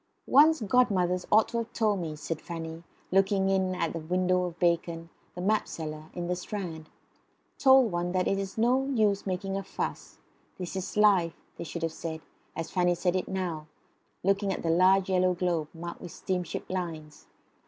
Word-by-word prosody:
"One's 310 +1 +5
godmothers 190 -6 +2
ought 215 +1 +5
to 235 - -1
have 230 0 -5
told 215 -3 +1
one," 160 -3 -4
said 155 +1 -4
Fanny, 165 -1 -6 0.3
looking 195 0 +3
in 190 -1 +1
at 170 - -1
the 165 - -3
window 180 +2 +1
of 175 -1 -6
Bacon, 170 -1 0 0.2
the 180 - -5
mapseller, 160 -6 -2
in 175 - -3
the 180 +1 -1
Strand 175 -4 -6 0.7
told 265 -4 +6
one 175 0 -1
that 185 -1 +1
it 195 - +1
is 195 +1 -5
no 250 +4 +3
use 215 -7 +1
making 195 +1 -2
a - - -2
fuss; - - -5 0.4
this 180 0 -5
is 190 +2 -4
life, 195 -6 +4 0.2
they - - -5
should 170 +1 -6
have 165 -1 -1
said, 160 -1 -5 0.3
as 165 -1 -4
Fanny 175 -1 +2
said 180 +1 0
it 185 - -1
now, 175 -5 -3 0.6
looking 195 +1 +2
at - - -4
the 165 - +1
large 185 +2 +4
yellow 185 -1 +2
globe 170 -3 0
marked 170 +1 -8
with 175 - -8
steamship 180 -1 -3
lines. 165 -5 -5
180 Hz, 180 wpm, -28 LUFS, 170-195 Hz, 0.7 s, told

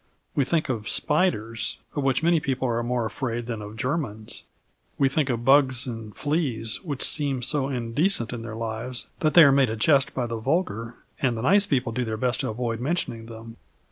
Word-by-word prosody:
We 140 - +2
think 160 +3 0
of 115 -5 -3
spiders, 115 - 0 0.2
of 145 - 0
which 135 +1 +1
many 170 0 +4
people 130 -2 -1
are 115 -1 0
more 120 0 -1
afraid 120 +1 -3
than 115 -2 -4
of 105 +1 -9
Germans. 120 -5 -3 0.5
We 135 - +4
think 140 0 0
of 120 -1 -2
bugs 135 -1 +5
and 115 -4 -7
fleas, 135 -8 -1
which 145 -7 -4
seem 140 -4 0
so 140 +1 0
indecent 125 - +1
in 120 - -5
their 115 -1 -6
lives 115 +2 -4
that 155 -1 +1
they 170 - +10
are 140 - +7
made 135 -3 +4
a 110 - -2
jest 135 +4 +3
by 125 - 0
the 115 -1 -4
vulgar 120 - -1 0.3
and 125 -4 +1
the 110 - -4
nice 200 +7 +4
people 130 -7 0
do 125 +2 -1
their 110 -2 -3
best 125 +2 0
to 130 - -1
avoid 115 0 -2
mentioning 125 -5 -2
them. 115 0 -10
125 Hz, 205 wpm, -25 LUFS, 115-140 Hz, 0.5 s, they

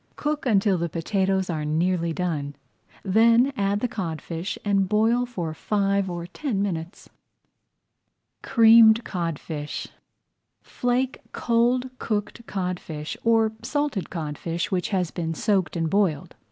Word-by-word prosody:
Cook 295 -2 -2
until 200 -4 +3
the 170 0 -1
potatoes 190 +3 0
are 155 -3 -2
nearly 170 +2 0
done, 155 -5 -3 0.5
then 230 +6 +4
add 200 -1 0
the 250 - +1
codfish 170 -4 -4
and 195 -2 +2
boil 225 +4 +2
for 175 -10 -4
five 200 +1 0
or 175 -1 -4
ten 215 - -3
minutes. 175 -2 -4 1.3
CREAMED 225 0 +6
CODFISH 165 -5 -4 0.7
Flake 250 +1 -1
cold 245 +2 +1
cooked 215 +2 -3
codfish, 180 -5 -4
or 225 -1 +3
salted 275 -4 -2
codfish 165 +1 -4
which 180 -2 0
has 185 -5 0
been 165 -2 -3
soaked 190 0 0
and 165 -1 0
boiled. 175 -5 0
195 Hz, 120 wpm, -24 LUFS, 170-225 Hz, 1.3 s, CREAMED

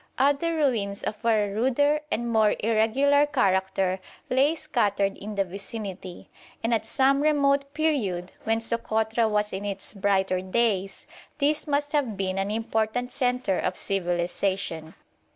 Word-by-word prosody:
Other 285 +5 +2
ruins 225 -10 0
of 210 +1 -4
a 220 -3 +3
ruder 265 +7 +2
and 240 +1 -1
more 220 -2 +3
irregular 260 +7 +3
character 190 -7 +1 0.3
lay 275 +5 +3
scattered 205 -11 0
in 210 +1 -7
the 200 - +2
vicinity, 195 -1 -7 0.4
and 230 +1 +1
at 220 -1 0
some 275 +1 +3
remote 280 -2 +2
period, 215 - -1
when 225 +1 0
Sokotra 225 0 0
was 210 0 0
in 190 +1 -4
its 200 -1 -4
brighter 190 -2 +1
days, 195 -1 -1 0.3
this 300 +2 +1
must 290 0 0
have 265 -9 0
been 190 0 -1
an 195 +1 -1
important 225 +2 -1
centre 250 -7 0
of 180 - -2
civilisation. 175 -2 -1
220 Hz, 135 wpm, -26 LUFS, 195-270 Hz, 0.4 s, a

